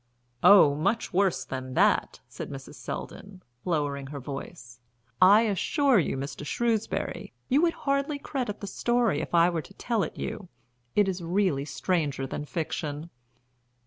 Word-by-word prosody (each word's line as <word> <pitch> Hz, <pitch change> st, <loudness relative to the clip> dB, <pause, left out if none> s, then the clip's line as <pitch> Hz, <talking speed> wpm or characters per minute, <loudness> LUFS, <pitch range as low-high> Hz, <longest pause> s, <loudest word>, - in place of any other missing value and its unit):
"Oh, 180 Hz, -6 st, +7 dB
much 195 Hz, +11 st, -1 dB
worse 190 Hz, -1 st, +1 dB
than 130 Hz, -1 st, -6 dB
that," -, -, +2 dB
said -, -, -7 dB
Mrs. -, -, -9 dB
Selldon, 195 Hz, -2 st, -8 dB, 0.2 s
lowering 145 Hz, -5 st, -1 dB
her 140 Hz, 0 st, -6 dB
voice. 135 Hz, -2 st, -8 dB, 0.4 s
"I 200 Hz, +4 st, +8 dB
assure 240 Hz, -, +2 dB
you, 155 Hz, -, -1 dB
Mr. 135 Hz, +2 st, -5 dB
Shrewsbury, 225 Hz, +7 st, -2 dB, 0.2 s
you 275 Hz, +3 st, +4 dB
would 340 Hz, -1 st, +3 dB
hardly 280 Hz, +1 st, 0 dB
credit 255 Hz, -7 st, -4 dB
the -, -, -4 dB
story 235 Hz, -5 st, +1 dB
if -, -, -3 dB
I 170 Hz, 0 st, +6 dB
were 165 Hz, -2 st, -2 dB
to 195 Hz, -, -16 dB
tell 230 Hz, -3 st, -1 dB
it -, -, -4 dB
you, 195 Hz, -4 st, -5 dB, 0.5 s
it 205 Hz, -1 st, +4 dB
is 185 Hz, -1 st, -2 dB
really 170 Hz, -5 st, 0 dB
stranger 150 Hz, -5 st, -1 dB
than 145 Hz, +2 st, -5 dB
fiction." 155 Hz, 0 st, -4 dB
180 Hz, 150 wpm, -27 LUFS, 145-215 Hz, 0.5 s, I